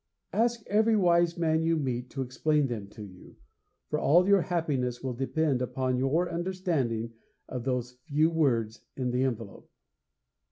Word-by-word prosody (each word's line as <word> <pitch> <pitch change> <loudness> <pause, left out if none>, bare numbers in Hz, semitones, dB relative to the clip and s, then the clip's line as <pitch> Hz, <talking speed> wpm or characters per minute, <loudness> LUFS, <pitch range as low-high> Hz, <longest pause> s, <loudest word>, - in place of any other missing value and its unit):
Ask 235 +1 +1
every 220 +2 +3
wise 170 -2 +3
man 160 -1 +1
you 165 0 +2
meet 125 -4 -2
to 135 - -3
explain 150 +4 +1
them 115 -6 -4
to 105 +1 -11
you, 95 -3 -13 0.5
for - - -1
all 175 +5 +4
your 200 -2 +5
happiness 140 -9 -1
will 130 -1 -2
depend 135 +1 0
upon 130 0 -1
your 150 +7 +1
understanding 165 - -2 0.3
of 125 -2 -5
those 125 -1 -2
few 155 +2 +2
words 115 -9 0
in 125 -2 -2
the 125 +1 0
envelope.' 115 -6 -4
135 Hz, 155 wpm, -28 LUFS, 125-170 Hz, 0.5 s, your